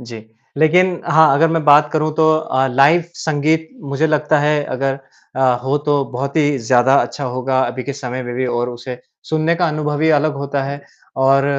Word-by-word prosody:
जी। 120 -2 -10 0.4
लेक़िन 175 +3 +2
हाँ, 155 -2 +4
अगर 160 +4 +3
मैं 165 -1 -1
बात 150 0 +5
करूँ 155 -1 0
तो 155 0 +3
अ, 135 -4 -1
लाइव 140 +7 +3
संगीत 160 +1 -1
मुझे 140 +3 -1
लगता 155 0 +1
है 150 0 +1
अगर 135 +1 -3 0.4
अ, - - -2 0.2
हो 135 +3 0
तो 145 -1 0
बहुत 140 +4 -4
ही 145 -3 +1
ज़्यादा 125 +2 +2
अच्छा 145 - -6
होगा 130 +1 -1
अभी 130 - -5
के 140 - -4
समय 130 -2 -6
में 120 -1 -6
भी 130 +1 -2
और 120 0 -2
उसे 120 +1 -8 0.3
सुनने 155 +1 0
का 175 0 +1
अनुभव 150 -1 -3
भी 160 +1 +1
अलग 155 0 +1
होता 140 0 -3
है। 140 +1 -6 0.4
और 135 +1 +3
145 Hz, 195 wpm, -17 LUFS, 130-155 Hz, 0.4 s, बात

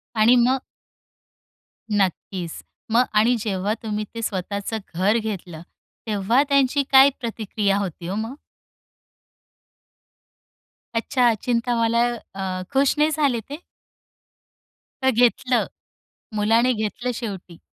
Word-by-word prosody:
आणि 225 +3 +5
मग? 260 +1 +2 1.3
नक्कीच. 185 -3 -2 0.3
मग 240 +2 +5
आणि 225 +4 +4
जेव्हा 205 -1 -1
तुम्ही 215 -1 -3
ते 230 - -5
स्वतःचं 200 +1 -3 0.2
घर 190 +6 +2
घेतलं, 185 -7 -5 0.4
तेव्हा 215 +4 +2
त्यांची 280 0 +3
काय 270 +1 +8
प्रतिक्रिया 215 -4 -1
होती 180 -4 -5
हो 190 - -2
मग? 225 +4 -4 2.6
अच्छा. 240 0 +2
चिंता 240 0 0
मला 230 +1 +3
अ, 195 -4 -9 0.3
खुश 275 0 +3
नाही 300 +1 +4
झाले 285 -6 +1
ते? 290 - -4 1.5
तर 265 - +4
घेतलं, 245 +1 +2 0.7
मुलाने 225 +4 +3
घेतलं 220 +3 -3
शेवटी. 195 -7 -7
225 Hz, 105 wpm, -23 LUFS, 200-250 Hz, 2.6 s, काय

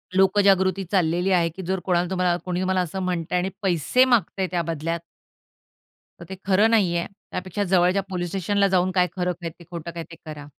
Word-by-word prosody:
लोकजागृती 195 0 +3
चाललेली 180 0 +1
आहे 170 -2 +3
की 190 - -6
जर 190 +1 -1
कोणाला 175 -1 +1
तुम्हाला 180 -2 +1
कोणी 180 0 -2
तुम्हाला 185 0 +1
असं 180 +2 -4
म्हणतंय 180 -1 -1
आणि 180 +2 0
पैसे 190 - +3
मागतंय 200 -6 +1
त्या 175 - 0
बदल्यात 165 0 -3 1.2
तर - - -10
ते 190 - -7
खरं 200 +3 +4
नाहीये. 180 -7 +2 0.3
त्यापेक्षा 185 +2 -3
जवळच्या 180 +1 +4
पोलिस 175 -2 -3
स्टेशनला 200 +2 +1
जाऊन 185 -1 +2
काय 180 -1 +2
खरं 180 -1 0
काय 170 - -3
ते? 170 +2 -16
खोटं 170 -1 -6
काय 170 0 -6
ते? 165 - -13
करा. 150 -2 -8
180 Hz, 185 wpm, -24 LUFS, 170-190 Hz, 1.2 s, खरं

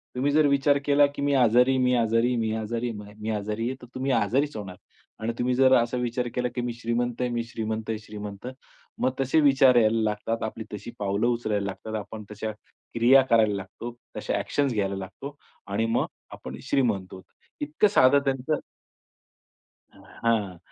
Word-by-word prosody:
तुम्ही 140 +3 +1
जर 150 0 +4
विचार 140 0 +3
केला, 145 0 +5
की 140 0 -8
मी 140 0 +1
आजारी 125 0 +5
आहे, 130 - +2
मी 125 0 +3
आजारी, 115 +1 +2
मी 110 -1 0
आजारी 115 +2 -2
आहे, 105 0 -12
मी 110 - -3
आजारी 105 +2 -2
आहे. 130 - -4
तर 125 - -11
तुम्ही 130 +1 -1
आजारीच 135 +6 +1
होणार. 95 -3 -7 0.4
आणि 115 +1 -2
तुम्ही 125 +1 +1
जर 130 0 +5
असा 120 +2 -2
विचार 125 0 -1
केला, 125 0 0
की 125 - -1
मी 120 -1 -3
श्रीमंत 120 +1 -2
आहे, 125 - 0
मी 120 -1 -1
श्रीमंत 110 -1 -4
आहे, 110 - -1
श्रीमंत. 105 +1 -8 0.5
मग 130 - +2
तसे 135 +4 +2
विचार 135 -3 +5
यायला 115 -1 +4
लागतात. 110 +2 -2
आपली 110 0 -5
तशी 110 +3 -7
पावलं 100 +3 0
उचलायला 110 -4 0
लागतात. 110 +3 -5
आपण 105 +1 -8
तशा 110 +1 -4 0.4
क्रिया 125 +4 +6
करायला 110 -3 +4
लागतो, 115 +5 -7 0.2
तशा - - -2
ॲक्शन्स 140 -4 0
घ्यायला 100 -2 -1
लागतो. 135 +9 -8 0.3
आणि 105 +3 0
मग 115 - +1 0.3
आपण 65 +1 -8
श्रीमंत 110 -9 +1
आहोत. 95 - -10 0.4
इतकं 150 +8 +2
साधं 140 -8 +5
त्यांचं 135 +3 0 1.3
हां. 105 -6 -2
115 Hz, 180 wpm, -26 LUFS, 110-130 Hz, 1.3 s, क्रिया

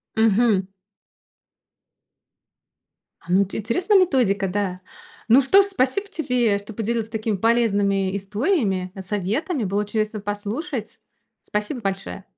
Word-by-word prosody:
Мгм. 220 -3 +3 2.5
А, 170 - -9
ну, 195 +2 +4
ти 195 - -6
интересная 350 - +2
методика, 240 - +2
да! 185 -1 -2 0.5
Ну 250 +5 +7
что 385 +10 +6
же, 395 - -1
спасибо 385 +3 0
тебе, 250 - 0
что 205 +2 -9
поделилась 225 +1 -2
такими 220 -2 -2
полезными 200 -3 +1
историями, 200 - -1
э, 195 - -6
советами. 215 - -2
Было 205 +1 -1
чудесно 215 0 -2
послушать! 210 - -4 0.4
Спасибо 210 +5 -3
большое! 195 -1 -4
215 Hz, 115 wpm, -23 LUFS, 200-245 Hz, 2.5 s, Ну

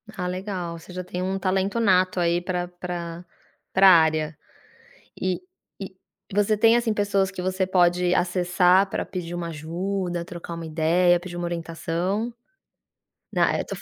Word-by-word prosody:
Ah, 180 -3 -3
legal, 180 -2 -4
você 180 - -13
já 180 0 -4
tem 180 0 -5
um 190 +1 -1
talento 195 +3 0
nato 185 -3 +3
aí 170 0 +2
pra 180 0 -2
pra 175 -1 -6 0.5
pra 190 0 +7
área 155 -3 +4 0.8
e 185 -1 -1 0.4
e 195 0 -12
você 205 +1 +2
tem, 225 +2 +6
assim, 235 -2 +1
pessoas 200 -2 +1
que 190 - -7
você 185 +1 0
pode 180 -1 +3
acessar 180 +1 +3
pra - - -2
pedir 175 -2 -5
uma 175 -1 -3
ajuda, 175 +3 -3
trocar 170 -1 -7
uma 165 0 -6
ideia, 170 +3 +3
pedir 175 0 -8
uma 175 - -3
orientação? 170 +6 -2 1.0
Nã - - +3
é, - - 0
eu - - -7
tô - - -5
f - - -11
180 Hz, 165 wpm, -24 LUFS, 170-190 Hz, 1.0 s, pra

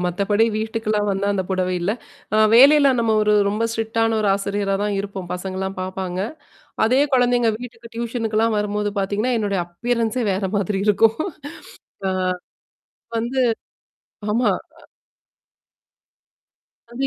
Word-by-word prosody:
மத்தபடி 200 +5 +1
வீட்டுக்கல்லாம் 215 -1 -1
வந்தா 195 0 -1
அந்த 190 - 0
புடவை 185 -1 0
இல்ல. 175 +3 0 0.4
அ - - +4 0.2
வேலையில 280 +3 +7
நம்ம 225 -1 +2
ஒரு 210 0 +3 0.2
ரொம்ப 215 +3 0
ஸ்ட்ரிக்ட்டான 225 0 0
ஒரு 210 - +1
ஆசிரியரா 200 0 -1
தான் 205 -1 -1
இருப்போம். 195 -3 -6
பசங்கள்லாம் 190 +1 -4
பார்ப்பாங்க. 185 -1 -4 0.7
அதே 255 +4 +3
குழந்தைங்க 245 -2 +3
வீட்டுக்கு 235 -1 -10
டியூஷனுக்குல்லாம் 225 -1 0
வரும்போது 210 0 -1
பார்த்தீங்கன்னா, 210 +6 0
என்னுடைய 200 -3 0
அப்பியரன்ஸே 230 +6 -1
வேற 190 +1 -2
மாதிரி 200 0 -1
இருக்கும். 220 +2 +4 0.9
அ. - - +1 1.1
வந்து 240 +4 -1 0.9
ஆமா. 235 +2 +2 0.3
அ - - -18 2.1
அது 240 +3 -5
210 Hz, 120 wpm, -21 LUFS, 195-230 Hz, 2.1 s, வேலையில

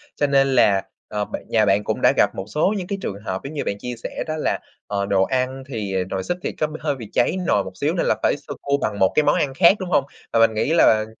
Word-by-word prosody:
Cho 145 - +1
nên 135 -1 +3
là, 100 -6 +4 0.2
ờ, 105 -1 -2
bạn - - -6
nhà 110 -2 +3
bạn 100 +1 +2
cũng - - -2
đã - - +5
gặp - - +3
một 95 - -5
số 155 - +1
những 180 - -5
cái 200 - -3
trường 100 0 -4
hợp 95 0 -3
giống 140 - -7
như 150 - -2
bạn 100 - -2
chia 125 +3 -5
sẻ - - -4
đó 155 - -2
là, 155 - -1 0.3
ờ, 100 -1 -1
đồ 100 -1 +2
ăn 130 +3 -1
thì, 105 -7 -4
ờ, 95 - +1
nồi 95 -1 -3
súp 175 - -2
thì - - -2
có 155 - -1
b 155 - -9
hơi 145 -3 -1
bị 115 -5 -9
cháy 120 - +2
nồi 100 - +3
một 95 - -7
xíu - - 0
nên - - 0
là - - +2
phải - - +3
sơ - - -8
cua 140 0 +1
bằng 100 -1 -2
một 95 - +4
cái 150 - +4
món - - +3
ăn 135 -2 0
khác, 170 +5 +6
đúng 185 - -5
hông? 145 -5 +3 0.3
Và 115 - +3
mình 115 -1 +5
nghĩ 125 +8 0
là 110 -10 +5
120 Hz, 300 wpm, -22 LUFS, 100-145 Hz, 0.3 s, khác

